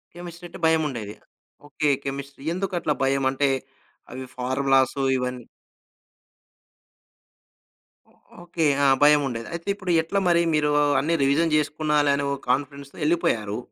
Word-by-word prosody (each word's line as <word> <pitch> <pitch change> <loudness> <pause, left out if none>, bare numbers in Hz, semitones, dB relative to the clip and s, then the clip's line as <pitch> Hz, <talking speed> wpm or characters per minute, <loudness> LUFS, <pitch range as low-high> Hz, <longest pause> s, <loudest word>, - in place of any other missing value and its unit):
Chemistry 175 0 -10
అంటే - - -11
భయముండేది. 135 -10 0 0.5
Okay. 150 +1 -1 0.2
Chemistry. 140 0 -6
ఎందుకట్లా 180 -4 -1
భయం? 135 0 +1
అంటే, 140 +1 +1 0.6
అవి 130 +1 -7
ఫార్మలాసు 135 +1 +1 0.2
ఇవన్నీ 125 -1 -4 2.6
ఓ - - -27 0.3
ఓకే. 170 -2 -2 0.2
ఆ! - - +4 0.2
భయముండేది. 140 -6 +3
అయితే 170 +3 -7
ఇప్పుడు 185 -3 -4
ఎట్లా 195 +5 -1
మరి 170 -1 +4
మీరు 150 -1 +1 0.3
అన్నీ 165 +4 0
రివిజన్ 155 +4 +2
జేసుకున్నాలే, 150 -1 +1
అనే 140 - -2
ఓ - - 0
కాన్ఫిడెన్స్‌తో 140 +1 -2
ఎళ్ళిపోయారు. 110 -10 0
145 Hz, 120 wpm, -24 LUFS, 135-165 Hz, 2.6 s, ఆ